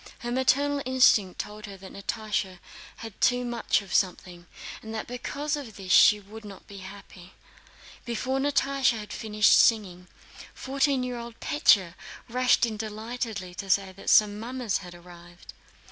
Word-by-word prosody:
Her 240 - -4
maternal 280 +3 +1
instinct 245 -7 +3
told 210 +1 -6
her 200 -1 -10
that 190 0 -12
Natásha 210 -2 -3 0.5
had 225 - -11
too 250 -1 +2
much 235 -3 0
of 195 - -10
something, 180 -2 -1 0.3
and 220 0 -8
that 220 - -4
because 285 +5 -4
of 260 -8 -8
this 190 -2 -6
she 210 +2 +7
would 215 +2 -12
not 200 -2 -12
be 200 -1 -11
happy. 190 -2 -12 0.7
Before 255 +3 -2
Natásha 275 -3 +1
had 210 -1 -8
finished 215 -1 +2
singing, 185 -6 +3 0.5
fourteen 275 0 0
year 250 -1 -4
old 235 -1 -10
Pétya 200 - +3 0.3
rushed 250 0 +3
in 220 -2 -5
delightedly, 215 -3 -5
to 195 +2 -8
say 195 0 +2
that 190 - -7
some 210 -1 +4
mummers 240 -2 -3
had 180 -2 -11
arrived. 175 0 -14
215 Hz, 155 wpm, -26 LUFS, 195-250 Hz, 0.7 s, she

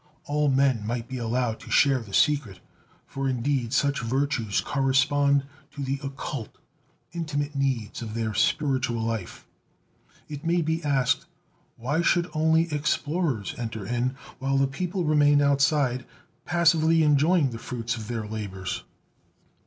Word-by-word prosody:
All 150 0 +1
men 135 -4 +2
might 115 +2 -3
be 130 0 -5
allowed 115 -1 -1
to - - -12
share 135 -2 +4
the 110 -4 -11
secret, 135 - +2 0.5
for 135 -1 -3
indeed 125 -1 -1
such 140 0 +1
virtues 120 -3 0
correspond 140 +1 +2 0.3
to 140 - -4
the 135 +1 -2
"occult," 135 -3 -6 0.6
intimate 150 -3 -3
needs 135 -7 -1
of 110 -1 -6
their 110 -2 -2
spiritual 130 -2 +1
life. 115 -5 -4 0.8
It 145 0 -7
may 170 +1 +1
be 160 +1 -1
asked: 145 +2 +1 0.5
Why 140 +8 0
should 175 0 +2
only 160 +1 +2
explorers 150 - -1
enter 110 -4 -4
in, 125 +4 -1 0.2
while 135 0 0
the 135 - +4
people 180 +7 -3
remain 145 -1 +4
outside, 140 -2 +2 0.4
passively 165 -1 +3
enjoying 150 0 +3
the 115 - -6
fruits 120 -1 -3
of 110 -2 -7
their 115 -2 -3
labors? 100 -3 -5
135 Hz, 135 wpm, -26 LUFS, 120-150 Hz, 0.8 s, share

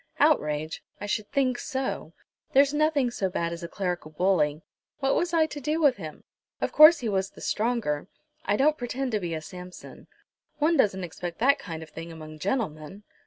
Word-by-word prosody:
"Outrage! 155 - +2 0.2
I 205 - -5
should 210 0 -2
think 255 -3 +1
so. 265 -2 -3 0.4
There's 280 +1 +5
nothing 295 -4 +2
so 195 -5 -1
bad 170 -2 -2
as 170 - -7
a 170 - -5
clerical 180 -3 -3
bully. 155 -2 +1 0.3
What 270 -1 +1
was 345 0 +1
I 330 -2 +4
to 295 -2 -7
do 305 +4 0
with 285 -5 +4
him? 155 -5 -8 0.4
Of - - -1
course 310 +3 +9
he 235 - -2
was 195 -2 0
the - - -16
stronger. 215 -10 -1 0.4
I 205 - +1
don't 305 +3 +3
pretend 250 +2 -3
to 215 - +1
be 170 -3 -3
a 155 - -4
Samson. 180 +3 -11 0.5
One 310 +3 +3
doesn't 190 -8 +2
expect 175 0 -6
that 275 +4 +4
kind 165 -7 -6
of 155 - -14
thing 165 +2 -8
among 155 -1 -10
gentlemen?" 185 - -3
205 Hz, 190 wpm, -27 LUFS, 165-275 Hz, 0.5 s, course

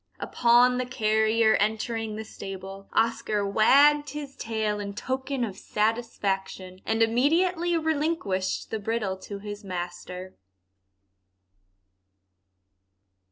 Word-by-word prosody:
Upon 245 +1 +4
the 255 - -2
carrier 220 -2 +2
entering 220 +1 -1
the 220 +1 -6
stable, 195 -1 -8
Oscar 215 -2 +1
wagged 285 +8 +5
his 285 -1 -7
tail 220 -2 -2
in 200 -1 -5
token 260 +2 -2
of 205 -5 -3
satisfaction, 195 -4 -2
and 225 +1 +3
immediately 335 +9 +2
relinquished 305 - -1
the 220 - -2
bridle 210 -2 -2
to 200 +2 -8
his 205 +1 -8
master. 180 0 -6
220 Hz, 100 wpm, -26 LUFS, 200-255 Hz, -, wagged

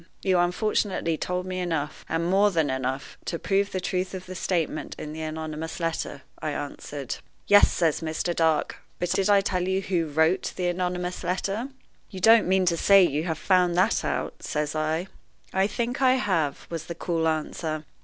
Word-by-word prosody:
"You 185 -2 +3
unfortunately 180 -1 +1
told 180 +3 -2
me 185 0 -3
enough, 160 -5 -2
and 165 +1 0
more 195 +3 +4
than 160 -7 +1
enough, 130 +1 -3
to 170 - -2
prove 200 +3 0
the 185 - -2
truth 185 +1 -2
of 185 - -7
the 185 - -7
statement 170 -4 -2
in 150 - -6
the 160 - -6
anonymous 155 +1 -5
letter," 165 -4 -3 0.2
I 155 - -1
answered. 145 -1 -5 0.3
"Yes," 205 0 +6
says 165 -3 +1
Mr. 160 +2 -2
Dark, 160 -2 +1 0.2
"but 175 - -2
did 195 +1 +1
I 200 -1 +6
tell 185 -2 -1
you 190 0 +1
who 180 -4 -1
wrote 160 +5 +1
the 180 -1 0
anonymous 180 0 -2
letter?" 195 +6 -1 0.4
"You 190 - -7
don't 225 +2 +6
mean 190 0 +3
to 170 -1 +2
say 195 +2 +6
that 170 - 0
you 150 +3 -1
have 160 -3 -2
found 180 -1 +2
that 185 - +3
out!" - - -3
says 150 0 -2
I. 155 +3 -1 0.5
"I 190 +1 +3
think 240 +4 -2
I 260 -1 +5
have," 170 - 0
was 165 -2 -4
the 170 - -5
cool 165 -1 -1
answer. 155 0 -2
175 Hz, 190 wpm, -26 LUFS, 160-190 Hz, 0.5 s, Yes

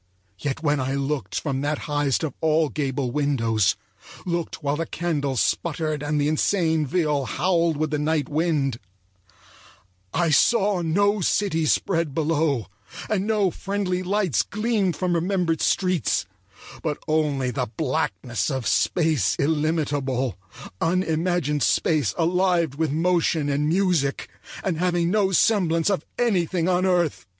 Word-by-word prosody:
Yet 145 - -3
when 145 -2 +2
I 135 +1 -1
looked 140 +1 -2
from 135 -3 -2
that 145 +1 -1
highest 145 -1 0
of 150 -5 -2
all 160 -1 +2
gable 135 -3 -2
windows, 115 -8 +1 0.5
looked 170 -3 -3
while 145 +1 0
the 165 0 -3
candles 145 -7 -1
sputtered 155 -3 -1
and 150 0 -1
the 145 - +1
insane 160 -1 +1
viol 150 -4 0
howled 170 0 +1
with 155 0 -1
the 150 - 0
night 150 -2 0
wind, 150 -6 0 1.3
I 170 -1 +1
saw 200 +4 +3
no 200 +5 +1
city 165 -3 +1
spread 165 -4 0
below, 155 -6 +1 0.5
and 205 -1 0
no 210 -4 +2
friendly 195 -1 -2
lights 185 - +1
gleamed 210 -5 -1
from 180 +3 -1
remembered 170 -1 0
streets, 180 - +1 0.6
but 155 -2 -2
only 150 -5 +1
the - - -2
blackness 120 - -1
of 130 -4 -3
space 150 - +1
illimitable; 145 - 0 0.5
unimagined 165 -3 0
space 155 +1 +1
alive 175 -2 +2
with 155 0 -1
motion 165 -2 +1
and 145 +2 0
music, 170 -6 +1 0.3
and 175 -5 -1
having 175 -1 +1
no 200 -2 +2
semblance 180 -3 +2
of 185 -5 -1
anything 185 -7 +1
on 185 +1 +2
earth. 175 - 0
160 Hz, 135 wpm, -24 LUFS, 145-180 Hz, 1.3 s, saw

